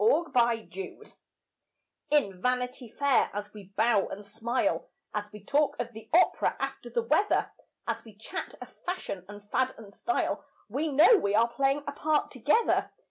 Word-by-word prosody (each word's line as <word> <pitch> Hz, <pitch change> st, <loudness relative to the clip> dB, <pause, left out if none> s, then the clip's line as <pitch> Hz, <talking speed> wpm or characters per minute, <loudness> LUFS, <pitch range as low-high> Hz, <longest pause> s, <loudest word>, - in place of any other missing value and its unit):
VANITY 235 Hz, -, +1 dB
FAIR 435 Hz, -, -16 dB, 1.0 s
In 200 Hz, -12 st, +2 dB
Vanity 250 Hz, -1 st, -1 dB
Fair, 280 Hz, +3 st, +2 dB
as 205 Hz, 0 st, -5 dB
we 210 Hz, -2 st, -10 dB
bow 220 Hz, -3 st, +3 dB
and 205 Hz, +1 st, -7 dB
smile, 225 Hz, +5 st, -1 dB, 0.2 s
As 210 Hz, 0 st, -3 dB
we 210 Hz, -2 st, -11 dB
talk 290 Hz, +6 st, +2 dB
of 240 Hz, -1 st, -3 dB
the 220 Hz, 0 st, -11 dB
opera 360 Hz, +3 st, +4 dB
after -, -, -4 dB
the 470 Hz, -, 0 dB
weather, 420 Hz, -3 st, +2 dB, 0.4 s
As -, -, -2 dB
we 220 Hz, -3 st, -14 dB
chat 225 Hz, -, -6 dB
of -, -, -10 dB
fashion 355 Hz, -, -4 dB
and 205 Hz, 0 st, -11 dB
fad 260 Hz, 0 st, +1 dB
and 205 Hz, -3 st, -12 dB
style, 360 Hz, -, -1 dB, 0.2 s
We 290 Hz, +8 st, -1 dB
know 320 Hz, -, +7 dB
we 205 Hz, -, +1 dB
are 230 Hz, +2 st, +5 dB
playing 275 Hz, +1 st, +1 dB
a 285 Hz, -, -3 dB
part 300 Hz, +1 st, 0 dB
together. 460 Hz, 0 st, +2 dB
245 Hz, 165 wpm, -29 LUFS, 210-295 Hz, 1.0 s, know